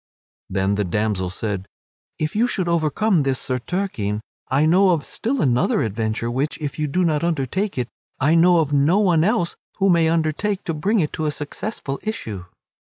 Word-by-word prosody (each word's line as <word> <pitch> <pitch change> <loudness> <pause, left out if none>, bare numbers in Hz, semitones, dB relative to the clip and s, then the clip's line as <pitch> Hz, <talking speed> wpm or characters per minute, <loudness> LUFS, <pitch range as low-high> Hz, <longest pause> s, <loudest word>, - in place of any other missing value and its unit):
Then 95 +1 +1
the 105 0 0
damsel 100 0 -1
said, 95 0 -4 0.5
"If 155 +3 -2
you 230 +3 +3
should 190 -7 -1
overcome 170 +3 +2
this 135 -2 0
Sir 130 -1 -2
Turquine, 120 - -2 0.3
I 140 +4 +3
know 185 +4 +5
of 165 -6 +1
still 255 +3 -2
another 125 -2 +2
adventure 110 +2 -2
which, 135 +5 -1
if 150 -1 -5
you 150 - 0
do 180 +6 +1
not 155 -1 +1
undertake 170 - -1
it, 125 -2 -1 0.3
I 145 +4 +3
know 175 +1 +5
of 150 -3 +1
no 145 +7 +4
one 180 -6 +3
else 190 -3 +1 0.2
who 195 -1 +3
may 165 -2 +4
undertake 165 +5 0
to 165 - -2
bring 195 +7 +1
it 150 - -2
to 155 - -2
a - - +2
successful 145 0 -5
issue." 110 - -5
155 Hz, 185 wpm, -22 LUFS, 125-180 Hz, 0.5 s, know